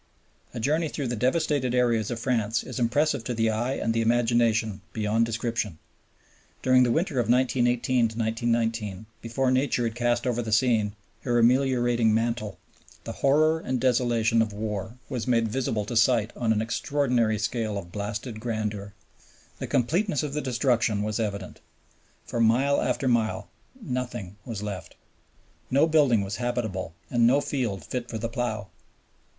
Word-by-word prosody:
A - - -3
journey 155 +7 +1
through 140 -5 -3
the 120 - -1
devastated 130 +1 +1
areas 120 -4 +2
of 120 - -3
France 115 -3 0
is - - -6
impressive 135 +2 +1
to 125 - -2
the 115 0 +2
eye 120 +4 -1
and 115 - -1
the 115 - +1
imagination 115 -2 +2
beyond 110 +1 +1
description. 115 -5 -2 0.9
During 130 0 +5
the 125 -2 +3
winter 160 -2 0
of 120 - 0
1918 125 -1 +2 0.4
19, 115 -3 -1 0.2
before 125 +3 0
Nature 130 -1 +1
had 115 -1 -1
cast 120 +1 0
over 120 -1 0
the 110 -2 -5
scene 110 -3 +2 0.3
her 120 -2 0
ameliorating 120 -2 +3
mantle, 115 -3 -1 0.5
the - - -5
horror 155 +3 +3
and 130 -5 -2
desolation 120 -2 +2
of 110 -2 0
war 105 +2 -4
was 125 -2 -4
made 115 -2 +2
visible 110 -3 -1
to 120 - -5
sight 115 -1 +3
on 115 -2 0
an 110 0 +1
extraordinary 120 -2 0
scale 110 -1 -2
of 85 -3 -7
blasted 105 +3 -5
grandeur. 105 -3 -4 0.6
The - - -4
completeness 155 - +1
of 145 -2 -4
the 150 - -1
destruction 120 -5 +1
was 105 +1 -2
evident. 100 -4 -4 0.7
For 120 - -4
mile 125 +5 +3
after 135 - 0
mile 115 -3 0 0.3
nothing 125 - -5
was 110 -4 -5
left. 95 -5 -6 0.7
No 140 +4 +4
building 145 -9 +3
was 100 +2 -4
habitable 110 -8 -3 0.2
and 120 -1 +4
no 135 +4 +4
field 115 - -2
fit 125 -1 -4
for 115 - -4
the 115 +1 -3
plow. 110 -5 -3
120 Hz, 155 wpm, -26 LUFS, 110-125 Hz, 0.9 s, During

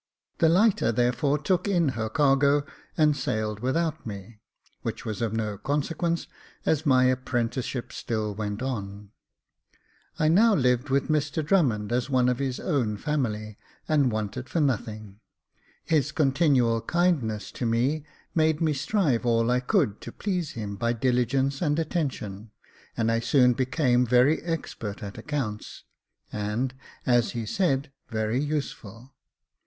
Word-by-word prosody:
The 165 - +5
lighter 185 - +3
therefore 125 +5 +1
took 175 +6 0
in 175 -6 +2
her 110 -3 -3
cargo, 140 0 +3 0.3
and 150 -2 +4
sailed 110 -4 -2
without 155 +6 -1
me, 105 0 -8 0.4
which - - -5
was 110 -1 -4
of 115 -2 0
no 110 -3 -3
consequence, 165 +4 -1 0.4
as 155 0 +1
my 130 -2 +5
apprenticeship 130 -1 -1
still 110 -2 -2
went 105 +2 -4
on. 100 -5 -5 1.1
I 155 - +2
now 210 +7 +5
lived 125 -1 +1
with 135 +1 +1
Mr 150 0 0
Drummond 125 - +2
as 125 +2 0
one 125 -2 +3
of 125 0 -1
his 135 -2 -2
own 120 - 0
family, 110 -6 -2 0.3
and 145 -5 +3
wanted 110 +4 -4
for 165 - -1
nothing. 110 -7 -2 0.7
His 155 -3 +1
continual 135 -6 +2
kindness 150 - 0
to 120 - -3
me 130 +7 +1 0.3
made 160 -2 +2
me 160 -2 +2
strive 145 - +1
all 115 0 +2
I 125 - +3
could 110 -4 0
to - - -7
please 180 -6 -3
him 105 -3 -5
by 115 +2 0
diligence 130 +3 +1
and 150 -3 +1
attention, 130 - -3 0.5
and 115 0 +1
I 115 - +2
soon 125 +1 +4
became 125 -1 +1
very 125 +6 +4
expert 145 -11 -5
at 100 -1 -7
accounts, 130 -8 -4 0.5
and, 105 +5 -2 0.3
as 120 -2 +2
he 115 -2 -3
said, 140 - 0 0.2
very 110 +2 -1
useful. 135 -5 -5
130 Hz, 140 wpm, -26 LUFS, 115-150 Hz, 1.1 s, The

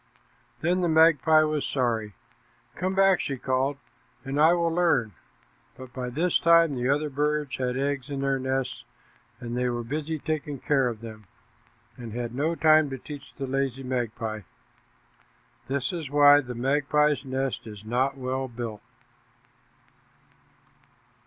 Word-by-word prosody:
Then 180 +3 +1
the 175 - +1
magpie 160 -1 +5
was 155 -1 -1
sorry. 115 -6 -1 0.6
"Come 185 +1 -2
back," 195 -2 +4
she 135 - -3
called, 130 +3 -1 0.5
"and 140 +2 -1
I 160 +2 +6
will 170 -1 +1
learn." 160 -11 +2 0.7
But 130 -1 -11
by 125 -1 -4
this 165 +8 +1
time 170 -2 +5
the 125 0 -1
other 150 +1 0
birds 150 0 -1
had 125 -1 -2
eggs 140 -1 -2
in 140 -1 -3
their 135 -1 0
nests, 130 0 -2 0.6
and 120 -1 -5
they 125 0 0
were 120 -1 -3
busy 155 +6 -3
taking 150 -1 -3
care 135 0 +1
of 115 -2 -5
them, 110 -3 -10 0.7
and 115 -3 -8
had 120 0 -4
no 155 +6 0
time 155 -2 +4
to 135 - -5
teach 145 +2 -10
the 135 - -4
lazy 135 0 -2
magpie. 115 -4 -3 1.3
This 135 +3 -2
is 160 -6 -5
why 145 0 +6
the 125 -3 -7
magpie's 145 +4 +1
nest 135 -2 -3
is 105 -1 -10
not 130 +4 0
well 130 0 -3
built. 115 -3 -6
135 Hz, 145 wpm, -26 LUFS, 125-150 Hz, 1.3 s, I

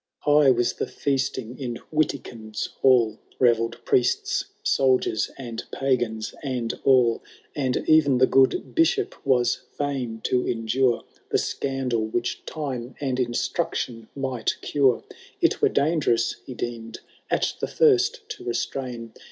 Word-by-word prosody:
XIII. 145 - +4
High 150 -2 +6
was 120 -2 +2
the - - -3
feasting 130 -3 -2
in 120 -3 -4 0.2
Witikind's 120 -8 -2 0.2
hall, 120 -5 +4 0.2
Beveird 120 -1 +2
priests, 125 0 +1 0.2
soldiers, 130 -5 +2
and 120 -4 -6
pagans, 120 -5 -1
and 125 -5 -2
all; 125 -4 +4 0.3
And 130 -3 0
e*en 150 -4 +5
the 130 - +6
good 130 0 +2
Bishop 390 +5 +2
was 125 -3 +2 0.2
&in 130 -6 -2
to 125 0 0
endure 120 +2 +1 0.3
The - - +2
scandal, 130 -4 -1
which 120 +2 -2
time 130 -5 -5
and 130 -3 -1
instruction 120 -1 -2
might 130 -4 -2
cure: 135 -4 +2 0.4
It - - +2
were - - +5
dangerous, 140 -7 +1
he 130 - -7
deem'd, 115 -2 -5 0.3
at - - +1
the - - -1
first 445 0 +3
to 430 -5 -7
restrain. 125 - -4
130 Hz, 130 wpm, -25 LUFS, 120-140 Hz, 0.4 s, High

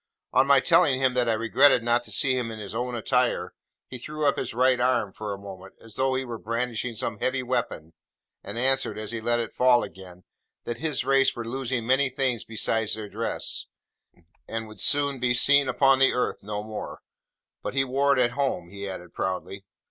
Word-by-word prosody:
On 130 +2 +4
my 140 -1 +6
telling 155 -3 +3
him 130 -1 +2
that 125 -2 +1
I - - +3
regretted 115 +3 +4
not 120 +1 +2
to 110 - -11
see 130 +5 +2
him 125 -2 -2
in 110 - -7
his 105 -1 -7
own 120 +2 -3
attire, 115 - 0 0.3
he 125 - -9
threw 150 +4 -4
up 140 - +3
his - - -4
right 125 +2 +2
arm, 120 -5 +1
for 105 -1 -6
a 100 - -4
moment, 95 -1 -11
as 115 -1 -12
though 130 +3 0
he 130 0 -2
were 115 -2 -6
brandishing 115 +1 -3
some 105 -1 -3
heavy 130 0 -1
weapon, 120 -10 -3 0.5
and 100 +3 -7
answered, 135 0 +1
as 110 0 -5
he 115 -1 -4
let 120 +1 +1
it 115 - -4
fall 125 -1 +4
again, 90 -2 -11 0.4
that 120 - -5
his 150 -5 -1
race 135 0 +3
were 120 -1 -6
losing 125 -1 -3
many 135 +2 +3
things 130 -3 -1
besides 110 0 -1
their 110 -2 -7
dress, - - -3 0.8
and 115 0 -4
would 110 -3 -8
soon 140 -2 +3
be 120 0 +1
seen 140 +2 +5
upon 135 -1 +3
the 135 - +4
earth 125 - -1
no 105 +1 -5
more: 110 0 -7 0.6
but - - -5
he 135 - +3
wore 140 +2 +2
it - - +2
at 120 -1 +3
home, 125 -10 -2
he 100 0 -7
added 90 -2 -8
proudly. 95 +1 -4
120 Hz, 210 wpm, -26 LUFS, 110-130 Hz, 0.8 s, my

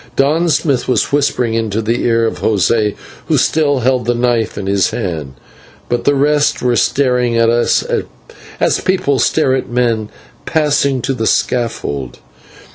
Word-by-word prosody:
Don 155 +5 +2
Smith 140 -5 0
was 130 - 0
whispering 125 -5 0
into 110 -2 -1
the 115 +2 -1
ear 115 -1 +2
of 115 - -3
José, 105 0 +1 0.3
who - - +2
still 145 -4 +1
held 125 -1 +1
the 120 - +1
knife 120 -2 0
in 100 - -4
his 100 -1 +1
hand, 75 -7 -5 0.5
but 120 0 -1
the 145 - +3
rest 145 0 +1
were 125 -1 +2
staring 125 +1 +1
at 115 0 +3
us 120 0 +1 0.7
as - - +1
people 160 -8 0
stare 145 -5 +2
at 130 - -2
men 120 -3 0 0.4
passing 140 -4 +1
to 135 - -1
the 110 -3 -2
scaffold. 95 - -2
120 Hz, 155 wpm, -15 LUFS, 110-140 Hz, 0.7 s, the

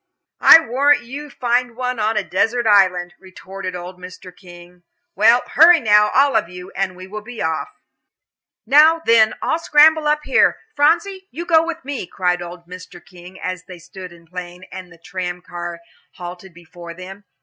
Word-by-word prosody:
"I - - +8
warrant 275 +2 +1
you 275 +5 -8
would 295 - -15
find 245 -1 -1
one 250 -1 -4
on 215 +1 -1
a - - 0
desert 230 +6 -1
island," 185 -4 +2
retorted 190 0 -9
old 180 +1 -9
Mr. 180 0 -12
King. 175 0 -16 0.3
"Well, 225 +5 +4
hurry 335 +3 +6
now, 210 -2 +3
all 275 -1 +3
of 210 -6 0
you 180 0 -11
and 190 -2 -3
we 185 0 -11
will 210 +3 -8
be 240 +2 -11
off." 160 0 -2 1.0
"Now, 310 +6 +4
then, 220 -1 +4
all 320 - -1
scramble 315 -1 +4
up 300 0 +1
here. - - +2 0.2
Phronsie, 345 +6 0
you 335 +6 -7
go 325 -2 +3
with 330 -4 -6
me," 275 -9 -5
cried 180 -1 -2
old 175 0 -10
Mr. 180 +1 -12
King, 180 +1 -15
as 185 +1 -6
they 180 - -11
stood 185 +2 -12
in 170 -1 -18
plein, 180 +1 -9
and 185 -1 -10
the 165 - -16
tram 180 +1 -6
car 175 -1 -7 0.3
halted 180 +1 -10
before 170 0 -13
them. 190 +3 -12
190 Hz, 180 wpm, -19 LUFS, 180-255 Hz, 1.0 s, I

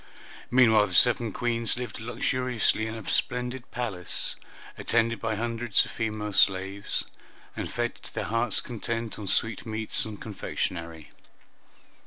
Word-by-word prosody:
Meanwhile 110 -4 +6
the 90 - -6
seven 120 +2 +5
Queens 115 0 +1
lived 125 -4 -5
luxuriously 120 -1 0
in 110 - -5
a 110 -3 -8
splendid 125 0 -1
palace, 105 -9 -2 0.4
attended 115 0 +1
by 110 -1 -1
hundreds 115 0 +1
of - - -9
female 110 -2 -3
slaves, 95 +2 +2 0.5
and - - -4
fed - - -1
to - - -8
their - - -1
hearts' 115 0 +1
content 115 -1 -4
on 105 - -6
sweetmeats 110 +1 0
and 110 -2 -6
confectionery. 85 -6 -4
115 Hz, 130 wpm, -27 LUFS, 105-120 Hz, 0.5 s, Meanwhile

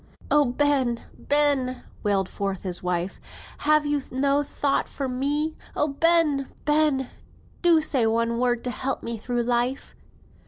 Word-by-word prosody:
"Oh, 295 -1 +5
Ben! 260 -2 +1 0.2
Ben!" 285 -3 +2 0.2
wailed 200 -3 +1
forth 195 -1 -4
his 180 -2 -2
wife, 180 +1 -2 0.4
"have 305 0 +3
you 290 -1 0
no 275 +2 +1
thought 280 -1 -1
for 275 - -4
me? 290 +5 0 0.2
Oh, 300 - +1
Ben! 300 -2 +2 0.2
Ben! 295 -3 +2 0.5
do 340 -3 +5
say 265 -7 +2
one 230 +1 0
word 245 -1 +1
to 250 - -2
help 270 +2 -3
me 230 -1 -4
through 240 +2 -1
life." 245 +2 -1
265 Hz, 145 wpm, -25 LUFS, 235-290 Hz, 0.5 s, Oh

